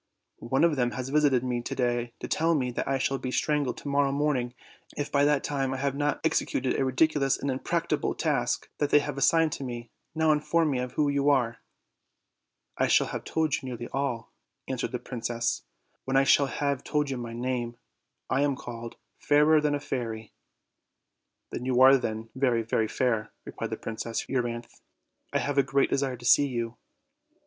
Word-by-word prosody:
One 130 +5 0
of 165 -4 +3
them 125 -1 +2
has 130 0 -4
visited 140 -4 +3
me 125 -1 -1
to - - -5
day 120 -1 -1
to - - -4
tell 165 +1 +2
me 125 -4 0
that - - -3
I 135 0 +1
shall 135 +1 -1
be 130 - -4
strangled 145 0 0
to - - -9
morrow 140 0 +2
morning 135 -4 0 0.4
if 145 - -3
by 140 0 +3
that 145 -1 +2
time 135 -2 -1
I - - -4
have 140 0 -1
not 145 +1 0
executed 130 -4 +1
a - - +2
ridiculous 135 +1 +2
and 140 - -2
impracticable 130 - -1
task - - 0
that 145 - +1
they - - +6
have 145 -1 -1
assigned 165 +2 +4
to 140 - -4
me; 120 -2 -6 0.2
now 160 0 +3
inform 155 +1 +2
me 130 - 0 0.2
who 150 - +2
you 140 0 +2
are." 120 -5 +2 1.2
"I - - +3
shall - - +4
have - - -4
told 160 -2 0
you - - +2
nearly 120 -3 -6
all," 135 -4 -3 0.4
answered 130 -2 -2
the 125 - -2
prin 125 -1 -7
cess, 115 0 -1 0.4
"when 135 0 +1
I 135 - +5
shall 140 0 +4
have 140 -1 -2
told 150 -2 0
you 130 - -2
my 120 -1 -6
name. 120 -1 -3 0.5
I 130 +2 +1
am 145 -1 +2
called 120 -3 -8 0.2
'Fairer 150 +1 +4
than 150 -1 +1
a - - -2
Fairy.' 115 -6 -4 1.2
"You 125 0 0
are 135 +1 +8
then 110 -3 -3
very, 125 -3 +1
very 110 0 0
fair," 110 -2 0
replied - - -5
Princess 115 0 -4
Eu 130 -1 +1
ryanthe; 120 0 -6 0.5
"I - - +1
have 145 -1 0
a - - +8
great 135 +1 +1
desire 135 -2 0
to 120 - -12
see 145 +3 +6
you." 120 -2 -4
135 Hz, 190 wpm, -28 LUFS, 120-145 Hz, 1.2 s, are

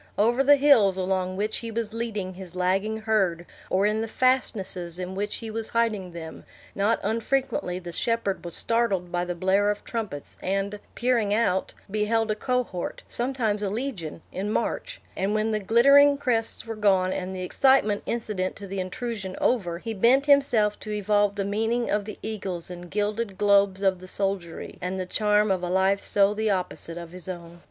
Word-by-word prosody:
Over 235 +6 +3
the 290 +1 +7
hills 255 -10 +5
along 185 0 -1
which 210 +2 -1
he 230 - -5
was 225 -1 -3
leading 215 -5 -3
his 185 -1 -9
lagging 195 +4 0
herd, 195 -6 +1 0.2
or 190 +2 +2
in 215 +1 +1
the 225 - -2
fastnesses 200 -9 +2
in 185 0 -4
which 205 +2 -3
he 225 -2 -6
was 225 0 -4
hiding 215 -6 0
them, 160 -1 -8 0.3
not 210 +3 +1
unfrequently 230 -1 -1
the 175 -1 -7
shepherd 230 0 -1
was 170 -1 -2
startled 200 -7 0
by 175 0 -1
the 175 0 -3
blare 190 +3 +2
of 210 - -2
trumpets, 210 -12 -5
and, 195 +2 -2 0.2
peering 235 -5 +1
out, 190 -4 0 0.2
beheld 215 +1 +1
a - - 0
cohort, 240 -6 -2
sometimes 235 -4 -1
a 200 - -1
legion, 205 - -5
in 195 +3 -3
march; - - -2 0.2
and 195 +3 0
when 215 +1 +1
the 215 - 0
glittering 280 +7 +6
crests 235 -5 0
were 225 - -4
gone, 190 -3 +2
and 190 0 -4
the 185 - -4
excitement 215 0 +3
incident 210 -5 -2
to 200 - -8
the 195 0 -5
intrusion 190 0 -4
over, 180 -9 +1
he 225 +5 -5
bent 245 +7 +4
himself 245 -8 +3
to 215 - -8
evolve 205 0 +1
the 200 -1 -2
meaning 225 +4 0
of 205 -1 0
the 215 - -7
eagles 190 -5 -4
and 175 0 -9
gilded 210 0 -2
globes 200 -1 +3
of 190 -2 +2
the 185 - -11
soldiery, 195 -3 -4
and 185 +1 -3
the 185 - -2
charm 210 +2 +2
of 185 -2 0
a 180 - -3
life 190 +2 +2
so 200 0 +3
the 220 +1 -1
opposite 180 -3 -2
of 170 -1 -8
his 180 0 -7
own. 175 -1 -8
205 Hz, 185 wpm, -26 LUFS, 185-225 Hz, 0.3 s, the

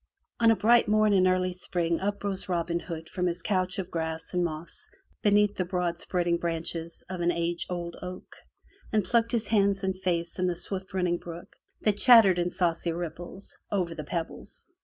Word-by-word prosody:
On 230 -1 +5
a 225 - +6
bright 230 +4 +4
morn 215 0 +4
in 185 -1 +5
early 185 0 +1
spring 170 -2 -1
up 200 +1 -2
rose 195 -2 -3
Robin 170 -1 0
Hood 165 -2 -7
from 180 +1 -1
his 170 0 -1
couch 185 -3 0
of 190 -1 -4
grass 160 0 -2
and 180 -1 +2
moss 160 0 -4 0.3
beneath 205 0 +4
the 185 - -1
broad 175 -1 -2
spreading 175 -2 0
branches 165 0 -3
of 185 -1 -5
an 170 0 +3
age 170 0 -1
old 175 -1 -4
oak, 180 0 -8 0.5
and 215 -2 +2
plunged 230 -1 +2
his 230 -2 +1
hands 200 -3 +2
and 190 0 0
face 175 -2 -2
in 185 - +2
the 180 - 0
swift 190 +2 -4
running 180 -2 +1
brook 170 0 -10 0.3
that 210 -1 +1
chattered 225 -8 +7
in 175 0 +1
saucy 170 -2 0
ripples 175 +3 -6 0.2
over 180 -4 0
the 155 -2 -6
pebbles. 165 +2 -5
180 Hz, 190 wpm, -28 LUFS, 170-195 Hz, 0.5 s, chattered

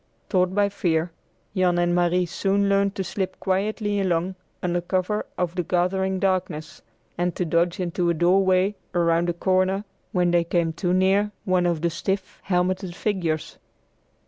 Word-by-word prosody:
Taught 185 -2 +2
by 205 0 +4
fear, 170 -4 0 0.4
Jan 180 -2 +2
and 175 0 +2
Marie 175 +1 +2
soon 195 +3 0
learned 200 0 +2
to 190 - -2
slip 190 0 -4
quietly 205 +2 0
along 180 -1 0 0.3
under 175 0 0
cover 185 +4 -1
of 175 -2 -1
the 180 - -1
gathering 190 +2 0
darkness, 185 -5 -2 0.4
and 175 -1 0
to 180 - -1
dodge 170 +3 +1
into 175 -1 0
a 170 - +1
doorway 185 +3 +3 0.2
or 175 -1 +3
round 170 +1 +2
a - - +1
corner, 185 +3 +1 0.3
when 180 -1 +2
they 175 -1 +3
came 170 -1 0
too 175 +2 -1
near 190 +3 +3 0.2
one 185 -1 +2
of 170 -3 0
the 170 0 +1
stiff, 190 +3 -3
helmeted 185 0 0
figures. 175 -7 -2
180 Hz, 165 wpm, -24 LUFS, 175-190 Hz, 0.4 s, by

